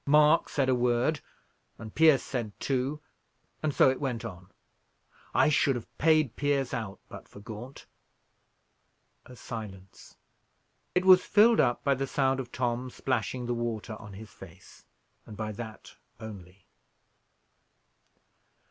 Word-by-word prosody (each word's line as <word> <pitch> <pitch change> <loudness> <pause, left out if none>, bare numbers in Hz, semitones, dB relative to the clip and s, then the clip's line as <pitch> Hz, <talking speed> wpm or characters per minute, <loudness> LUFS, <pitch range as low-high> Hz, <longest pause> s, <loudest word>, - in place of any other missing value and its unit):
Mark 150 +2 +5
said 135 -2 0
a 130 - +3
word, 125 +4 +1 0.6
and 110 -2 -10
Pierce 155 -3 +5
said 115 -6 -5
two, 135 +2 -1 0.6
and 155 - 0
so - - +5
it 130 - -5
went 125 -4 -3
on. 95 -3 -9 0.8
I - - +4
should 140 -2 +2
have 120 - -8
paid 155 -5 +3
Pierce 140 -3 0
out, 110 -5 -4
but - - -11
for - - -14
Gaunt." 115 +5 -10 1.4
A 125 - -12
silence. 100 -6 -9 0.8
It 180 +1 +2
was 185 -1 +8
filled 225 +2 +5
up 120 - +2
by 140 - +3
the 135 +1 -2
sound 135 -1 +1
of 125 -2 -6
Tom 125 0 -2
splashing 125 -1 -2
the 120 - -1
water 115 -2 -4
on 105 -2 -11
his 105 +2 -11
face, - - -15 0.4
and 105 - -10
by 110 -1 -3
that 110 +1 -9 0.3
only. 100 -4 -11
125 Hz, 140 wpm, -28 LUFS, 110-140 Hz, 1.4 s, was